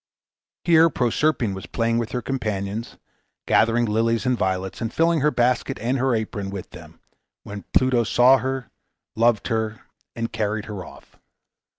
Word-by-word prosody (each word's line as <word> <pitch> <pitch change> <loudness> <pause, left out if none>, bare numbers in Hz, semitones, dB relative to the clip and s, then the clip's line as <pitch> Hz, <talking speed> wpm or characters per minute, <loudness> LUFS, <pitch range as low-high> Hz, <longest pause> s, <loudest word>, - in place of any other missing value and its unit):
Here 165 -1 +5
Proserpine 125 -3 0
was 95 -1 -8
playing 115 0 0
with 115 +1 -3
her 125 -2 -3
companions, 105 -3 -3 0.5
gathering 115 +1 +3
lilies 115 +2 0
and 125 0 +2
violets, 95 -3 -2
and 115 -1 -2
filling 165 +2 +2
her 150 +2 +3
basket 120 -5 0
and 125 +5 -1
her 130 -1 +2
apron 105 -3 -3
with 95 -2 -7
them, 85 -1 -13 0.4
when 100 -1 -8
Pluto 130 -2 +3
saw 125 +3 +5
her, 130 -1 -4 0.4
loved 115 0 +2
her, 110 -2 -2 0.3
and 115 0 -4
carried 105 0 -2
her 105 -5 -6
off. - - -15
115 Hz, 155 wpm, -23 LUFS, 105-125 Hz, 0.5 s, Here